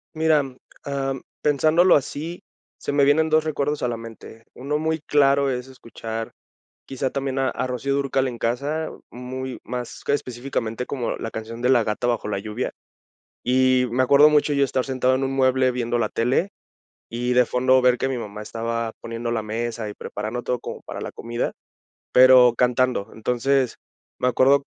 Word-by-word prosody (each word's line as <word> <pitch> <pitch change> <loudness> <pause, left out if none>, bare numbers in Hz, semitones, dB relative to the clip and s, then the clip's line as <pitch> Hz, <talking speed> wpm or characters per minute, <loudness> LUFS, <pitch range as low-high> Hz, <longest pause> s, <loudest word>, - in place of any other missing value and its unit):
Mira, 160 -1 +3
mm, 130 -2 -9 0.3
ah, 135 -1 -2
mm, 130 - -9 0.2
pensándolo 155 +5 +4
así, 155 +5 -3 0.4
se - - -3
me 140 0 +3
vienen 155 +3 +4
2 155 0 +3
recuerdos 150 -1 -2
a 125 - +2
la 120 - -3
mente. 115 0 -11
Uno 140 +4 -2
muy 160 +1 -1
claro 140 -1 +3
es 125 0 -3
escuchar, 115 -3 -7 0.5
quizá 135 0 -2
también 135 0 -2
a 130 -1 +2
a - - -3
Rocío 130 +2 -2
Dúrcal 135 -1 0
en 120 -2 -5
casa, 140 +8 -1 0.2
muy 130 +1 -6
más 125 -1 -6
que - - +1
específicamente 125 -3 -3
como 125 -4 -3
la 115 - -5
canción 115 +1 -7
de 125 - +2
La 125 -3 +5
gata 105 +3 -2
bajo 120 -3 -1
la 100 -2 -2
lluvia. 110 +4 -4 0.7
Y 130 0 +3
me 130 +2 +2
acuerdo 140 +3 +7
mucho 150 0 +3
yo 140 -1 +3
estar 130 -1 0
sentado 130 -1 +1
en 135 - -1
un 135 - -1
mueble 130 -1 +3
viendo 120 -1 -1
la 110 -3 0
tele, 130 +11 +1 0.6
y 125 +1 0
de 125 0 +5
fondo 130 +2 +3
ver 125 -1 +4
que 130 - -1
mi 130 -2 -2
mamá 105 -2 -7
estaba 115 +1 -3
poniendo 115 0 -4
la 110 -2 -1
mesa 115 0 -3
y 105 - -7
preparando 110 +4 -5
todo 125 - -1
como - - -7
para - - -7
la - - -5
comida, 120 +1 -3 0.6
pero 125 -1 +7
cantando, 125 -3 +2
entonces, 125 +3 0 0.4
me - - 0
acuerdo 135 +3 +4
130 Hz, 185 wpm, -23 LUFS, 120-140 Hz, 0.7 s, acuerdo